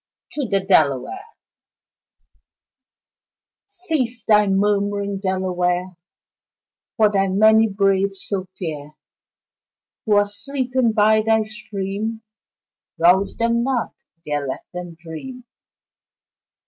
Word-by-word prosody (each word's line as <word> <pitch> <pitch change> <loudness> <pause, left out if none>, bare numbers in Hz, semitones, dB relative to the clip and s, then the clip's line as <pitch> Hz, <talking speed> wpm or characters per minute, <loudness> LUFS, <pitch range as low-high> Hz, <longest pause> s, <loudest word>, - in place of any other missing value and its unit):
To 285 -4 -3
the 195 - +2
Delaware 190 - +1 2.4
Cease 315 -12 -2
thy 210 -1 +4
murmuring, 200 0 0
Delaware, 185 -1 -1 1.0
For 215 -2 +4
thy 195 -1 +2
many 220 +3 +5
braves 195 -1 0
so 195 -2 -3
fair 150 -3 -6 1.1
Who 210 - +4
are 205 - +4
sleeping 250 +2 0
by 215 0 +4
thy 220 0 +2
stream 215 +1 -5 0.7
Rouse 180 +4 +3
them 235 0 +1
not 250 -1 -1 0.3
there 145 -2 -2
let 130 - -5
them 175 -1 -7
dream. 210 +11 -9
205 Hz, 95 wpm, -21 LUFS, 185-225 Hz, 2.4 s, many